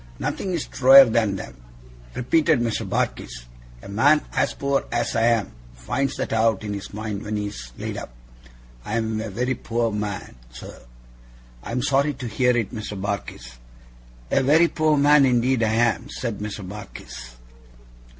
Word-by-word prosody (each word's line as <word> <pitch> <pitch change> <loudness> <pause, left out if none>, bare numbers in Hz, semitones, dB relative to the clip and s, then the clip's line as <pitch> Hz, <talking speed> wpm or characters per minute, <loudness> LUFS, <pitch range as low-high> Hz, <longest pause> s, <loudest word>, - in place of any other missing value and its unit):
'Nothing's 175 - -3
truer 135 +1 +8
than 110 -4 +1
them,' 95 - -9 0.5
repeated 155 +3 +2
Mr. 115 -2 -2
Barkis; - - -3 0.4
'a - - -10
man 140 +10 +3
as - - +1
poor 140 0 0
as 120 0 -1
I 115 0 +3
am, 115 -4 +1 0.2
finds 125 - -2
that - - -3
out 110 -2 +2
in 105 -1 -4
his 100 0 -7
mind 105 -1 -5
when 105 0 -4
he's 100 -13 -5
laid - - -5
up. - - -7 0.7
I'm 110 0 -2
a 110 - -5
very 125 +6 -1
poor 115 -2 -2
man, 105 -9 -5
sir!' - - -11 0.8
'I - - -8
am 125 +2 -1
sorry 140 +1 +1
to 130 -1 -7
hear 125 +2 +2
it, 115 -1 -2
Mr. 105 -3 -6
Barkis.' 65 -11 -5 0.7
'A - - +3
very 155 +6 +5
poor 155 -1 +2
man, 145 0 +5
indeed 125 -1 +2
I 110 -1 +1
am,' 120 +3 +1
said 120 -7 -4
Mr. 105 -2 -6
Barkis. 60 -11 -10
115 Hz, 160 wpm, -23 LUFS, 105-130 Hz, 0.8 s, truer